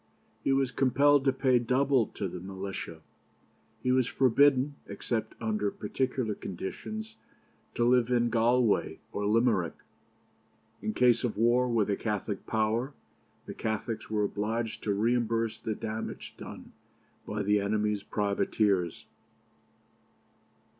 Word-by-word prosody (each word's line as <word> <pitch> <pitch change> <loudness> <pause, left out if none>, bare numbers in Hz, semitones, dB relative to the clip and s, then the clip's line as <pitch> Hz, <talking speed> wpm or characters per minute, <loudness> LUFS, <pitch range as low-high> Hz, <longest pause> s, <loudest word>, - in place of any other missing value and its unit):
He - - +2
was 135 -1 +2
compelled 140 +3 +3
to 135 - +5
pay 130 -2 +3
double 130 +1 +2
to 100 - -4
the 90 0 -6
militia. 95 -3 -6 0.8
He 125 - +2
was 130 -1 +3
forbidden, 135 +2 +4
except 110 -2 -3
under 105 -2 0
particular 125 +2 -2
conditions, 220 - -6 0.6
to 120 - +2
live 125 -1 +4
in 120 -1 +2
Galway 120 -1 +2
or 100 0 -2
Limerick. 110 -5 +2 1.1
In 105 +1 -3
case 125 -1 +4
of 115 -4 -1
war 120 +3 +3
with 115 -4 +2
a 100 - +1
Catholic 105 -1 -3
power, 115 +5 0 0.5
the - - -6
Catholics 110 0 -3
were 105 -1 +1
obliged 110 +3 -2
to 105 - +1
reimburse 115 +1 +1
the 110 - -3
damage 110 +1 -5
done - - -10 0.6
by 105 0 -2
the 105 +1 +3
enemy's 105 0 0
privateers. 100 -3 0
115 Hz, 125 wpm, -29 LUFS, 105-125 Hz, 1.1 s, to